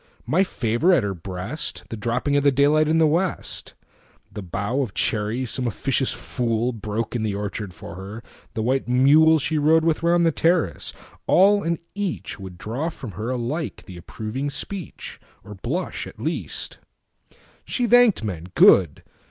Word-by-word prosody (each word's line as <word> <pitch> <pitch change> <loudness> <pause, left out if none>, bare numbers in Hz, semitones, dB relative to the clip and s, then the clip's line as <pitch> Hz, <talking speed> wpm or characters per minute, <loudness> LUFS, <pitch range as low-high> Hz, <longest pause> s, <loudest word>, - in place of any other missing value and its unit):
My 160 +10 +3
favor 120 - +1
at 175 - +3
her 100 -1 -1
breast, 95 - -5
The - - -4
dropping 120 +6 -1
of 145 - +3
the 140 - +5
daylight 145 +3 +3
in 160 +1 +2
the 160 - +5
West, 170 +4 -1 0.6
The 105 - -6
bough 100 +8 -2
of 120 -7 -4
cherries 110 +3 -1
some 130 -2 -1
officious 130 +3 0
foolBroke 115 -2 -2
in 120 - -1
the 105 -2 -1
orchard 100 -1 -4
for 90 - -10
her, 100 +5 -8 0.3
the 110 - -1
white 130 +3 0
muleShe 150 +4 +4
rode 160 +2 +4
with 160 -2 +1
round 170 0 +3
the 165 - +4
terrace—all 180 +4 +1
and 170 -1 -1 0.2
eachWould 105 - -5
draw 120 - -3
from 130 -8 -8
her 105 +6 -5
alike 130 +6 -3
the 90 - -10
approving 110 - -5
speech, 190 +7 -6 0.2
Or - - -10
blush, - - -4
at - - -13
least. - - -3 0.8
She 245 - -1
thanked 240 - +5
men,—good! 90 -3 +3
130 Hz, 150 wpm, -23 LUFS, 105-160 Hz, 0.8 s, the